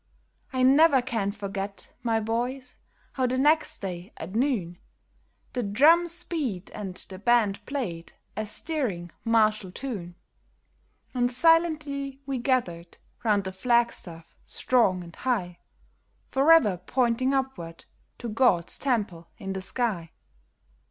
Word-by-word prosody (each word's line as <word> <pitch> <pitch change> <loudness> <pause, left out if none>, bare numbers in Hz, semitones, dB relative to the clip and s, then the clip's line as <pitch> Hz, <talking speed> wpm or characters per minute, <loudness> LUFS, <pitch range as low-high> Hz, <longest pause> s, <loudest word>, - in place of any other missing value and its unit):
I 255 -1 0
never 275 +2 +6
can 225 -6 -1
forget, 200 -1 -6
my 230 -2 +1
boys, 245 +4 -3 0.4
how 260 -1 0
the 255 +1 -1
next 300 +3 +2
day, 180 -2 -6
at 170 +4 -7
noon, 215 -9 0 0.7
The 250 - -1
drums 330 - +4
beat 250 - -3
and 195 -3 -6
the 185 0 -10
band 220 -3 +2
played 185 -13 -4 0.2
a 215 0 -3
stirring 210 - -2
martial 215 -4 +2
tune, 190 -7 -6 1.0
And 245 -1 +1
silently 295 -2 +2
we 270 -2 -2
gathered 180 -10 -1 0.3
round 210 -3 +2
the 190 - -4
flag 235 +3 +2
staff, 165 -2 -9
strong 195 -8 +2
and 170 -1 -12
high, 180 -9 -2 0.7
Forever 270 - +5
pointing 250 +6 +1
upward 190 -12 -4 0.3
to 240 - -6
God's 215 -7 +2
temple 205 -11 -1
in 195 -1 -5
the 190 - -4
sky. 190 -6 -2
230 Hz, 125 wpm, -27 LUFS, 190-265 Hz, 1.0 s, never